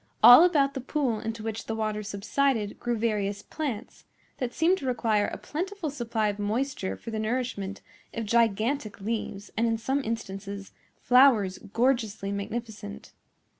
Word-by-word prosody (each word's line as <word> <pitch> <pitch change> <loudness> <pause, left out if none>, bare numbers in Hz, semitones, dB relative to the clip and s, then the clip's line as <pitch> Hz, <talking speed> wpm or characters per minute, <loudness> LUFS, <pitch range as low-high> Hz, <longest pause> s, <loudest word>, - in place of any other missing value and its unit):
All 245 +7 +11
about 290 -6 +3
the 270 - -4
pool 255 -4 -1
into 225 0 -5
which 225 0 -4
the 225 - -2
water 215 -1 -2
subsided 215 +2 -1
grew 240 -1 -1
various 205 -2 -1
plants, 275 -9 -5 0.4
that 250 -2 -2
seemed 345 +7 +2
to 270 - -5
require 225 -4 +1
a - - -5
plentiful 360 0 -4
supply 230 -5 -1
of 205 0 -4
moisture 215 0 -2
for 230 - -8
the 220 - -2
nourishment 220 -4 -2 0.3
of 230 -1 -4
gigantic 225 +1 +1
leaves, 205 -1 -4
and 230 +2 +2
in 225 0 +1
some 270 +5 -1
instances, 200 -3 -5 0.3
flowers 245 -7 +5
gorgeously 220 -2 0
magnificent. 205 0 -6
225 Hz, 150 wpm, -27 LUFS, 205-255 Hz, 0.4 s, All